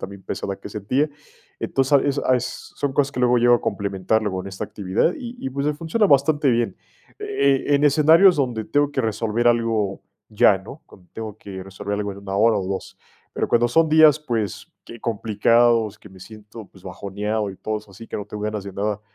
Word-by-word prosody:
también, 100 0 -8
pesada 100 0 -4
que 100 - -10
sentía. 120 +9 -1 0.5
Entonces, 135 +1 -1
a - - -2
eso 140 0 0
eso 125 0 -5
son 140 -2 -2
cosas 140 0 +1
que 130 - -8
luego 125 -1 +3
llego 120 +1 +5
a - - -8
complementar 100 +2 -1
luego 95 -3 -2
en - - -9
esta 95 -1 -7
actividad 100 - 0
y 245 -1 -7
y, 135 - -2
pues, 140 +2 -3
me 150 - +1
funciona 170 +8 +1
bastante 145 -1 +3
bien. 120 -1 0 0.4
Eh, 270 - +1
en 140 - +2
escenarios 160 +5 +6
donde 120 -6 -1
tengo 145 0 +1
que 135 - 0
resolver 115 +1 0
algo 115 -4 0 0.3
ya, 105 -2 +4
¿no? 120 +10 -12
Cuando 90 -2 -19
tengo 110 -2 -7
que 95 -3 -9
resolver 95 +1 -5
algo 100 -1 -3
en 100 - -11
1, 100 0 -5
hora 110 +1 +4
o 95 - -2
2, 95 - -5 0.4
pero, - - -2
cuando 120 0 +3
son 160 +6 +3
días, 155 -1 +6
pues, 115 -9 -3
que 115 - -11
complicados, 115 0 +2
que 105 - -15
me 95 -1 -16
siento, 110 +1 -12
pues, 95 -1 -20
bajoneado 100 +3 -3
y 95 - -11
todo 110 0 -3
eso 105 -1 -18
así, 115 +4 -12
que - - -5
no 105 - -5
tengo 105 0 -7
ganas 105 -2 -3
de 100 - -8
nada, 105 +2 -2
110 Hz, 215 wpm, -22 LUFS, 100-135 Hz, 0.5 s, escenarios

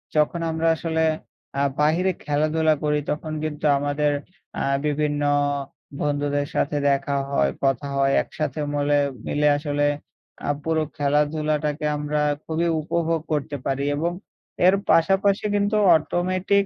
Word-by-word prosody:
যখন 150 +3 +2
আমরা 160 +1 0
আসলে 160 0 -1 0.6
আ - - +3 0.2
বাহিরে 165 +5 +3
খেলাধুলা 155 +2 +2
করি 150 0 +2
তখন 155 +1 -4
কিন্তু 155 -1 -4
আমাদের 145 +1 0 0.5
আ - - 0 0.2
বিভিন্ন 150 0 0 0.8
বন্ধুদের 145 -1 0
সাথে 145 +1 0
দেখা 140 0 0
হয় 70 - +2
কথা 135 +1 +1
হয় 135 0 +3
একসাথে 150 -1 -4
মলে 145 0 +2 0.3
মিলে 150 0 +2
আসলে 145 -1 -1 0.6
আ - - 0
পুরো 160 -1 +1
খেলাধুলাটাকে 150 +1 0
আমরা 150 0 -1 0.2
খুবই 165 +1 0
উপভোগ 165 +1 0
করতে 145 -1 -1
পারি। 135 +1 -1
এবং 170 +4 0 0.6
এর 190 - +6 0.2
পাশাপাশি 195 +4 +3
কিন্তু 205 +1 +1 0.2
অটোমেটিক 185 +5 0
150 Hz, 125 wpm, -23 LUFS, 145-160 Hz, 0.8 s, এর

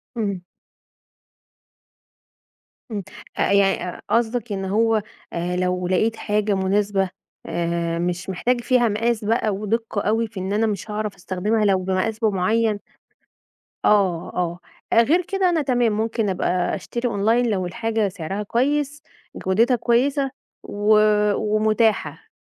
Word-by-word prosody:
امم. 200 -6 -2 2.5
امم. 205 -2 -3 0.3
آآ، - - +1
يع 195 -2 +2
قصدك 235 0 0
إن 195 -1 -2
هو 220 +3 +2 0.3
لو 180 +1 -1
لقيت 215 +5 +1
حاجة 210 -1 0
مناسبة 195 0 +1 0.4
آآ، 170 0 -1
مش 180 +2 -2
محتاج 240 +6 0
فيها 240 -1 +3
مقاس 220 +1 0
بقى 220 0 +1
ودِقة 210 +1 -2
أوي 225 +3 +1
في 215 -3 -8
إن 190 +2 -3
أنا 220 +2 +2
مش 210 +1 -4
هاعرف 210 -1 -3
أستخدمها 195 +4 -1
لو 195 -2 +3
بمقاس 190 +4 -1
بمعين، 215 0 +1 1.1
آه، 190 -5 +3
آه، 175 -1 -1 0.4
غير 285 +11 +4
كده 380 0 +1
أنا 325 -3 +1
تمام 245 -4 +2
ممكن 220 0 -1
أبقى 180 -1 0
أشتري 235 +6 -3
أونلاين 225 +3 +2
لو 190 -3 -1
الحاجة 220 +3 -1
سعرها 190 +2 -4
كويّس 285 +6 0 0.3
جودتها 230 +7 +2
كويّسة 265 +4 +1 0.3
و 210 +1 +2 0.4
ومتاحة. 215 +1 +1
210 Hz, 125 wpm, -22 LUFS, 190-230 Hz, 2.5 s, غير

